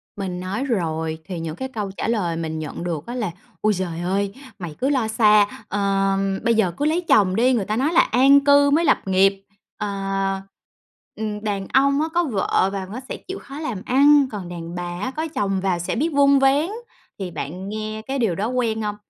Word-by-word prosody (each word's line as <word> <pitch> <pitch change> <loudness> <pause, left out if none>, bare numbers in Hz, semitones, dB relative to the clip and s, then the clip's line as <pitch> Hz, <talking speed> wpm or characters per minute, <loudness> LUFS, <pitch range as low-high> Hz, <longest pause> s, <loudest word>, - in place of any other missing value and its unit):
Mình 185 -3 -4
nói 190 +7 -3
rồi 160 - -1
thì 180 -3 -5
những 160 -1 -4
cái 260 +8 -4
câu 210 -6 -4
trả - - -2
lời 200 -8 0
mình 160 -1 -3
nhận 155 +2 -6
được 165 -4 -3
á 240 - -5
là 215 -8 -2 0.3
"Ôi 215 0 +3
giời 175 -3 -3
ơi, 195 +2 -1 0.3
mày 170 -4 -6
cứ 270 - +1
lo 260 -6 +1
xa. 215 -2 +5 0.2
Ờm, 195 -1 0
bây 230 0 +3
giờ 205 -5 +2
cứ 290 - 0
lấy 320 +4 +2
chồng 200 - +3
đi, 250 +4 +3
người 210 -5 0
ta 215 - -1
nói 285 +7 +1
là 340 - +7
an 270 +4 +5
cư 285 0 +6
mới 320 +4 +3
lập - - +4
nghiệp. 195 +1 +3 0.3
Ờ, 210 - -3 1.3
ừm, 215 -1 -4
đàn 200 -2 -2
ông 280 +2 +4
á 315 - 0
có 345 0 +3
vợ 195 - +1
vào 190 -1 -4
nó 225 +5 -6
sẽ - - -4
chịu 380 +1 -8
khó 275 +2 -9
làm 230 -11 -4
ăn, 285 +2 +5
còn 195 -4 -6
đàn 170 -1 -7
bà 175 0 -5
á 255 - -2
có 315 +1 -2
chồng 195 -2 0
vào 185 -2 0
sẽ 175 - -2
biết 310 +7 +1
vun 280 -1 +4
vén." 275 +5 +3 0.5
Thì 185 -3 -4
bạn 180 +8 -6
nghe 215 +1 -4
cái 270 +1 -2
điều 215 -8 +1
đó 205 +5 -1
quen 230 -3 -1
không? 210 -1 -2
210 Hz, 220 wpm, -22 LUFS, 185-260 Hz, 1.3 s, là